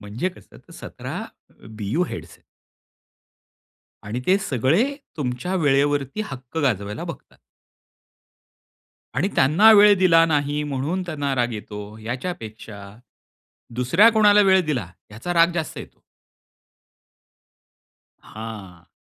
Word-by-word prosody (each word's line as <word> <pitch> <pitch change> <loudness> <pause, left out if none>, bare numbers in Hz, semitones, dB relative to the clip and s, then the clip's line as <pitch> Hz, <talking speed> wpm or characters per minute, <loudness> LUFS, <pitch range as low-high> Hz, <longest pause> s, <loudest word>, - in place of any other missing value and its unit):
म्हणजे 105 - -3
कसं 180 - -17
तर - - -16
17 - - -8 0.3
अ, - - -19
बीओ 110 - -1
हेड्स - - -8
आहेत. - - -20 1.6
आणि 110 +5 -4
ते 190 - +4
सगळे 150 - +1 0.3
तुमच्या 140 +6 -3
वेळेवरती 145 +4 +1
हक्क 135 - -10
गाजवायला 105 -5 -1
बघतात. - - -10 1.8
आणि 175 +9 +1
त्यांना 165 +12 +6
वेळ 210 -1 +7
दिला 165 -3 +5
नाही 145 -1 0
म्हणून 145 +6 -2
त्यांना 145 -6 -3
राग 120 -1 0
येतो, 105 0 -8
याच्यापेक्षा 110 - -7 0.9
दुसऱ्या 150 - +4
कोणाला 210 -1 +5
वेळ 190 -1 +5
दिला 125 - -2 0.2
याचा 115 +12 -5
राग 170 +1 +4
जास्त 160 -3 -4
येतो. - - -11 2.2
हां. 100 -6 -10
140 Hz, 110 wpm, -22 LUFS, 110-175 Hz, 2.2 s, वेळ